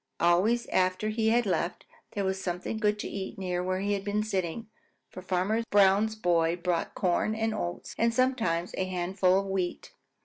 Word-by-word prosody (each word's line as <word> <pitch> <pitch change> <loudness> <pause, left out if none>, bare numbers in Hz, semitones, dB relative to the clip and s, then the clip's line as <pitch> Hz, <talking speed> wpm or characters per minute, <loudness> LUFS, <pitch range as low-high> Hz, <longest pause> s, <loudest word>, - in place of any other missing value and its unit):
Always 190 +8 +3
after 185 +3 +1
he 220 0 +1
had 240 +1 +3
left, 175 -2 -1 0.3
there 200 -1 -1
was 190 0 -1
something 180 +4 -3
good 210 -1 +2
to - - -4
eat 195 -1 -5
near 180 -2 -2
where 185 +1 -1
he 205 +1 0
had 200 -1 -2
been 210 +1 0
sitting, 200 +1 -3 0.4
for 185 - -8
Farmer 190 +5 0
Brown's 205 +2 +4
boy 170 -4 +2
brought 175 -1 -2
corn 190 +4 +1
and 225 0 0
oats 85 - -4
and 230 0 +3
sometimes 230 -9 0
a 190 - +1
handful 185 +1 +1
of - - -7
wheat. 190 -2 -3
190 Hz, 180 wpm, -28 LUFS, 180-215 Hz, 0.4 s, Brown's